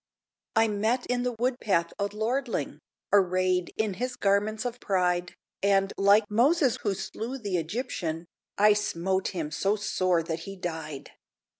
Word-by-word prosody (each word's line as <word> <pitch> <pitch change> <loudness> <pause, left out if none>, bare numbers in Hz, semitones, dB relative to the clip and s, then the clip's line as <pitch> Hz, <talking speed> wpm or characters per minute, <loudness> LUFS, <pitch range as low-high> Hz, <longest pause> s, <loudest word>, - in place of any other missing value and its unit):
I 225 0 +5
met 220 +4 0
in 250 0 0
the 250 0 -1
wood 245 +2 -1
path 170 -5 +1
a 200 - +1
lordling, 220 +7 -2 0.3
Arrayed 185 -2 +3
in 220 -2 0
his 250 +6 -3
garments 205 +3 +1
of 245 0 -3
pride, 180 -4 0 0.3
And, 195 -1 +2
like 200 +2 +5
Moses 260 - +3
who 205 -4 0
slew 220 +7 -5
the 200 -7 -2
Egyptian, 170 -3 -3 0.3
I 210 +1 +6
smote 190 -2 -1
him 160 -5 -4
so 195 +6 +1
sore 185 -4 +1
that 160 0 -3
he 195 +4 -8
died! 160 -6 -6
200 Hz, 150 wpm, -28 LUFS, 180-225 Hz, 0.3 s, I